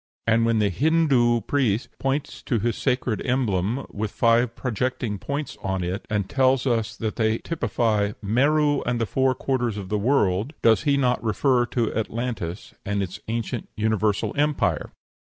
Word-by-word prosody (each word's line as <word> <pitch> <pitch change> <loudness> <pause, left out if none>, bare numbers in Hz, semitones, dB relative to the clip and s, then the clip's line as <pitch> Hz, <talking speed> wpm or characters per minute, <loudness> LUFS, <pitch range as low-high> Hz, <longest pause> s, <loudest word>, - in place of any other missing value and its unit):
And 115 0 +3
when 115 -1 +2
the 105 -2 +2
Hindoo 135 - +3
priest 125 -4 0
points 135 +2 -2
to 120 - +1
his 115 +1 0
sacred 125 -3 -1
emblem 120 -2 0
with 105 +1 -3
five 115 +2 +2
projecting 120 -3 -2
points 140 +4 -4
upon 95 -1 -2
it, 90 +4 -4
and 105 -3 -1
tells 130 +2 +2
us 115 -4 0
that 110 -1 -3
they 110 -1 +2
typify 110 -10 0
"Mero 145 +7 +2
and 120 -1 -1
the 115 - +1
four 130 +5 +1
quarters 120 -5 -1
of 95 -2 -6
the 105 0 0
world," 105 - +1
does 110 -4 +4
he 140 - +3
not 125 -3 +1
refer 120 +2 +2
to 115 -3 -1
Atlantis 110 -5 -4
and 100 0 -1
its 90 -1 -6
ancient 115 +1 -3
universal 110 -1 0
empire? 150 0 0
115 Hz, 160 wpm, -24 LUFS, 105-130 Hz, -, does